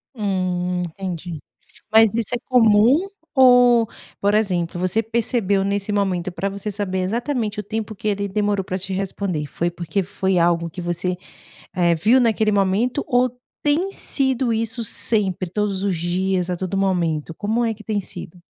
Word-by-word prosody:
Hum, 180 -3 -1
entendi, 175 -2 -6 0.5
mas 220 -1 +6
isso 230 -2 -1
é - - -1
comum 245 - +4 0.2
ou, 245 -3 +6 0.3
por 205 +1 +1
exemplo, 180 -5 0
você 185 +5 +1
percebeu 225 -3 0
nesse 200 +1 -1
momento 185 -3 0
pra 195 +2 -3
você 200 +2 -5
saber 195 -2 -3
exatamente 225 +2 -2
o - - -3
tempo 215 +1 -4
que 215 - -5
ele 200 -1 0
demorou 205 0 0
pra 185 +1 -3
te 190 +1 -5
responder, 185 -5 -3
foi 170 +4 -2
porque 175 +3 -2
foi 190 0 -1
algo 170 0 +2
que 180 - -10
você, 175 +1 -2 0.6
eh, 175 -2 +3
viu 225 +10 +4
naquele 220 -2 +2
momento 205 +8 +1
ou 250 0 +2 0.3
tem 320 +7 +1
sido 265 -7 0
isso 230 +1 -2
sempre 195 -5 +1
todos 200 -1 -1
os 195 -4 0
dias, 180 +2 -1
a 180 - -1
todo 190 +2 -3
momento, 170 -5 0
como 220 +5 -1
é 225 - +1
que 215 0 -11
tem 215 -2 -1
sido? 180 -2 -9
200 Hz, 165 wpm, -21 LUFS, 180-225 Hz, 0.6 s, mas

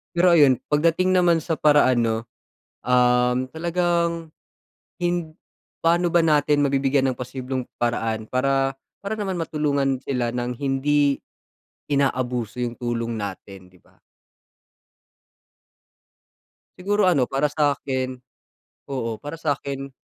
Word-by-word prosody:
Pero 175 +1 +5
ayun, 145 -6 +6 0.2
pagdating 165 +5 +2
naman 175 -3 +3
sa 160 -1 -2
paraan, 145 -5 +4
'no? 115 -1 +1 0.7
Um, 125 0 +3
talagang, 170 +1 -1 0.7
hind 175 -2 -1 0.5
paano 170 +1 +2
ba 165 -1 +3
natin 150 -1 +3
mabibigyan 135 0 +1
ng 130 - 0
posibleng 130 +1 -4 0.2
paraan 115 -2 -1
para 135 +2 0 0.2
para 200 +2 -4
naman 195 -4 -3
matulungan 140 -5 -1
sila 125 -4 -2
ng 125 0 -3
hindi 140 +1 +1 0.7
inaabuso 125 -4 -1
yung 120 -1 -4
tulong 115 -1 -3
natin, 100 -2 -7
'di 90 - -23
ba? - - -28 2.8
Siguro 205 +1 +1
ano 160 -8 +3
para 135 +4 0
sa'kin 135 -3 -1 0.7
oo, 115 -5 -3
para 145 +2 -7
sa'kin, 140 -3 -3
135 Hz, 110 wpm, -23 LUFS, 125-165 Hz, 2.8 s, ayun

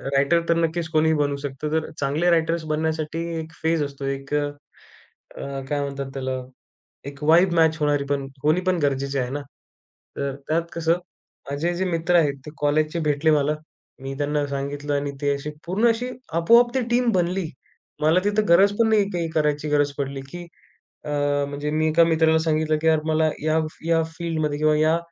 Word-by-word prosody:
Writer 140 +5 +3
तर 170 - +4
नक्कीच 165 0 0
कोणीही 160 0 +3
बनू 145 -1 0
शकतं. 140 +1 -5
तर 160 0 -1
चांगले 145 +5 +1
रायटर्स. 165 0 +1
बनण्यासाठी 155 +1 -2 0.2
एक 160 0 -7
फेज 160 0 +2
असतो, 140 -1 -6
एक 135 +1 -4
अ, 150 - +2 0.9
अ, 140 -1 -5
काय 145 - 0
म्हणतात 140 -1 -4
त्याला? 130 -1 -3 0.7
एक 140 +1 -12
वाइब 170 +4 +5
मॅच 160 -1 +4
होणारी 145 -1 +1
पण 140 -1 -1 0.2
होणी 155 +5 +3
पण 185 -1 +3
गरजेची 140 0 0
आहे 125 - -1
ना. 145 +1 -3 0.8
तर 140 -1 -2
त्यात 165 +2 +2
कसं 165 0 +1 0.6
माझे 160 +5 -1
जे 190 +2 -1
मित्र 170 0 0
आहेत, 150 -5 +3
ते 150 - -8
कॉलेजचे 155 +3 +1
भेटले 150 +2 +2
मला. 150 0 +2 0.5
मी 135 0 -5
त्यांना 145 0 0
सांगितलं 140 +1 -3
आणि 140 0 -1
ते 145 0 +2
असे 140 +2 -5 0.2
पूर्ण 200 +7 +2
अशी 240 +2 -1 0.2
आपोआप 235 +9 +5
ती 260 - +2
टीम 240 0 +2
बनली. 180 -1 0 0.5
मला 160 +4 +4
तिथं 210 +1 +1
गरज 195 +4 +6
पण 230 -1 +4
नाही, 210 -2 +3
काही 170 -2 -2
करायची 150 -1 +1
गरज 145 -1 +2
पडली. 135 -1 -3
की 175 -1 -8 0.6
अ, 150 - -5 0.4
म्हणजे 145 +1 -3
मी 155 +1 +1
एका 165 +2 +5
मित्राला 160 -1 +3
सांगितलं 155 -1 +1
की 160 - -2
यार, 160 -1 +4
मला 155 0 +2
या 155 +1 +2 0.3
या 165 -1 +3
फील्डमध्ये 155 -4 -2
किंवा 155 0 +3
या 155 +2 +3
155 Hz, 180 wpm, -23 LUFS, 145-170 Hz, 0.9 s, गरज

